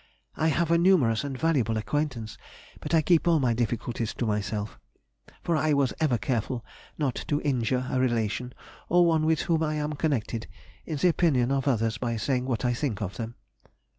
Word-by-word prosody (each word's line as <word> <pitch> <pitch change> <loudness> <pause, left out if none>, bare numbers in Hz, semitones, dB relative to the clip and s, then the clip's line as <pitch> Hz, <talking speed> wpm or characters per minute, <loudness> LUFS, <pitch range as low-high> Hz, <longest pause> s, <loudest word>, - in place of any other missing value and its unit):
I 160 - +1
have 165 +2 +1
a 170 - +4
numerous 155 -12 +3
and 140 -2 -4
valuable 130 -8 +1
acquaintance, 125 -2 -2 0.4
but - - -1
I 160 - +4
keep 170 +1 +3
all 165 -2 +4
my 125 -4 +2
difficulties 115 0 -2
to 120 - -2
myself, 105 0 -2 0.6
for 170 - +1
I 155 0 +2
was 140 -3 +2
ever 150 -7 +2
careful 120 +2 -2 0.3
not 140 -5 0
to 145 -2 +1
injure 130 -2 0
a 130 - -1
relation, 120 -1 -1 0.3
or 175 0 +5
one 160 -2 +2
with 160 -1 +2
whom 165 -2 +1
I 155 -1 0
am 150 0 -2
connected, 130 -7 -2 0.4
in 155 - -3
the 180 +6 +3
opinion 140 -7 +2
of 135 0 0
others, 115 -2 +1
by 120 -2 -2
saying 125 +3 0
what 125 -3 -2
I 120 - +2
think 120 -5 -2
of 100 -3 -4
them. 115 0 -5
130 Hz, 190 wpm, -27 LUFS, 115-155 Hz, 0.6 s, or